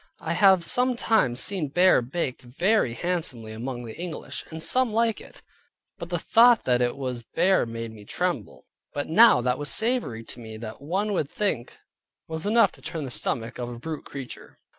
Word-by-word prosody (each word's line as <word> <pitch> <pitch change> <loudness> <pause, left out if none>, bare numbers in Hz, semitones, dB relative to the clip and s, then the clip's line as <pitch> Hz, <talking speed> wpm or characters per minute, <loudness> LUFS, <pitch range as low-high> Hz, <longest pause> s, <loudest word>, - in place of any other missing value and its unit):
I 165 - -3
have 185 -1 +5
sometime 230 - +2
seen 165 +5 -2
bear 175 +2 +4
baked 130 +1 -3
very 140 - +1
handsomely 150 -11 -3
among 120 +2 -5
the 110 - -8
English, 175 -2 -5
and 160 - -7
some 255 +8 +1
like 225 0 +1
it, - - -15 0.6
but 170 - -7
the 175 - -1
thought 230 +6 +5
that 125 -1 +2
it 120 +2 0
was 130 -3 -4
bear 185 +5 +2
made 115 0 -6
me 110 -2 -12
tremble. - - -3 0.3
But 145 - -2
now 205 - +6
that 125 +2 0
was 145 - -2
savory 220 - 0
to 120 - -11
me 110 -2 -9
that 110 +1 -8
one 195 +8 -1
would 150 -7 -1
think 175 - -2 0.5
was 160 +3 -4
enough 230 +2 +4
to - - -18
turn 160 -3 -5
the 130 - -6
stomach 115 0 -3
of 120 -1 -4
a 120 - -7
brute 155 +4 -6
creature. 135 -3 -9
155 Hz, 185 wpm, -25 LUFS, 120-195 Hz, 0.6 s, now